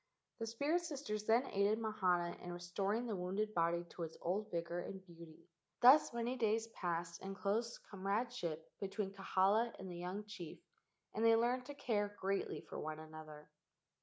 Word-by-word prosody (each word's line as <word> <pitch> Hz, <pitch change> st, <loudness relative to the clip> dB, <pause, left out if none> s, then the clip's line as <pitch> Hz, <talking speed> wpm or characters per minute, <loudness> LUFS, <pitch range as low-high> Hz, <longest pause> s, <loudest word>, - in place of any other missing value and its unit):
The 225 Hz, -, -2 dB
spirit 285 Hz, +10 st, +1 dB
sisters 275 Hz, -10 st, -3 dB
then 235 Hz, +4 st, +4 dB
aided 200 Hz, +2 st, +3 dB
Mahana 185 Hz, -6 st, +1 dB
in 180 Hz, -, -6 dB
restor¬ 175 Hz, +4 st, -1 dB
ing 240 Hz, -, -2 dB
the 225 Hz, -4 st, -1 dB
wounded 195 Hz, +4 st, -1 dB
body 170 Hz, -1 st, +2 dB
to -, -, -8 dB
its 160 Hz, -1 st, -4 dB
old 200 Hz, +5 st, -1 dB
vigor 170 Hz, 0 st, -2 dB
and 190 Hz, +2 st, -5 dB
beauty. 170 Hz, -1 st, -13 dB, 0.3 s
Thus 270 Hz, +5 st, +8 dB
many 235 Hz, +2 st, -1 dB
days 225 Hz, -1 st, +2 dB
passed 170 Hz, -4 st, -3 dB
in 195 Hz, 0 st, -5 dB
close 210 Hz, +5 st, 0 dB
com¬ 195 Hz, -, -7 dB
radeship 200 Hz, -6 st, -1 dB, 0.2 s
between 195 Hz, 0 st, -2 dB
Kahala 200 Hz, +4 st, +3 dB
and 190 Hz, -1 st, -6 dB
the 175 Hz, -, -6 dB
young 185 Hz, +4 st, -4 dB
chief, 205 Hz, -6 st, -7 dB, 0.6 s
and 220 Hz, -, 0 dB
they 230 Hz, 0 st, +7 dB
learned 245 Hz, +2 st, +2 dB
to 285 Hz, -, -6 dB
care 205 Hz, -6 st, 0 dB
greatly 195 Hz, +1 st, -1 dB
for -, -, -7 dB
one 155 Hz, 0 st, -3 dB
another. 155 Hz, -1 st, -10 dB
200 Hz, 175 wpm, -38 LUFS, 175-225 Hz, 0.6 s, Thus